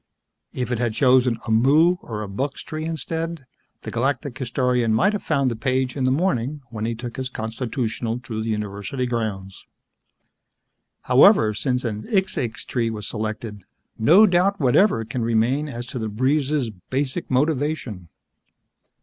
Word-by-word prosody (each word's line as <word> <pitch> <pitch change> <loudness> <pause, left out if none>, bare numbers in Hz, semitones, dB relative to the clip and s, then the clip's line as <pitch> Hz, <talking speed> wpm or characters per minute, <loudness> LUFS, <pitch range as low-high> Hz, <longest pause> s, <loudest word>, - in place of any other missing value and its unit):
If 125 0 -3
it 120 - -1
had 120 -3 -1
chosen 125 -2 +4
a 115 - -3
muu 150 +10 +4
or 105 -2 -5
a - - -6
buxx 135 +8 -4
tree 155 0 -5
instead, 165 -1 -4 0.4
the - - -6
Galactic 135 +2 -1
Historian 125 -3 0
might 130 - +3
have 210 - -2
found 140 -4 +1
the - - -3
page 130 +2 -1
in 135 -3 -1
the 130 - +3
morning 145 -3 0
when 110 -1 -4
he 115 0 -2
took 120 +1 -7
his 130 -1 -3
constitutional 115 0 -3
through 120 -3 -5
the 115 - -3
university 105 +4 -3
grounds. 105 -6 -4 1.4
However, 110 -1 +5
since 125 +3 -1
a 115 - 0
xixxix 115 - -1
tree 115 -3 -1
was 105 -2 -5
selected, 110 -2 -5 0.4
no 170 - +7
doubt 190 +1 +2
whatever 130 - +3
can 120 +2 -4
remain 115 +6 +1
as 120 -2 -6
to 125 - -6
the 110 -1 -3
breeze's 135 +2 0 0.2
basic 135 +5 -2
motivation. 135 - -1
125 Hz, 155 wpm, -23 LUFS, 110-145 Hz, 1.4 s, no